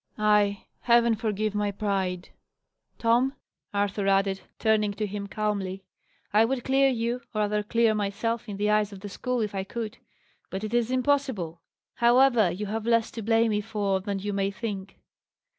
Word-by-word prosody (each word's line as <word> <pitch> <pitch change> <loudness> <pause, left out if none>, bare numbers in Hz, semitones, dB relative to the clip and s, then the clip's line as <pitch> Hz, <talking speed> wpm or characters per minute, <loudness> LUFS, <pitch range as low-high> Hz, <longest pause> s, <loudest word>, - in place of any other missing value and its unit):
"Ay! 210 -1 +2
Heaven 235 -1 +4
forgive 215 -1 -1
my 210 0 0
pride, 190 -3 -2 0.7
Tom!" 240 +4 +2 0.4
Arthur 200 0 -1
added, 195 0 +2 0.2
turning 215 -2 +2
to 215 - -1
him 200 0 -5
calmly. 195 -2 -2 0.5
"I 215 +2 +6
would 245 +1 -1
clear 270 +1 +4
you 235 -1 -1 0.2
or 215 - +1
rather 210 0 +1
clear 230 +1 +2
myself 215 +3 -2
in 200 - -5
the 210 +1 +1
eyes 210 -1 +2
of 195 -2 -10
the 205 - -6
school, 250 +4 -2
if 210 -2 -2
I 195 -1 -2
could: 225 +3 -6 0.5
but 190 +2 -5
it 215 +1 -4
is 240 -1 +2
impossible. 255 - 0 0.4
However, 240 -3 +5
you 195 +5 -4
have 220 +2 -3
less 230 -1 +2
to 225 - -6
blame 225 +1 +3
me 210 0 +1
for 200 -2 -1
than 200 +1 -3
you 205 +1 -3
may 195 0 0
think." 200 -2 -6
210 Hz, 175 wpm, -27 LUFS, 200-230 Hz, 0.7 s, I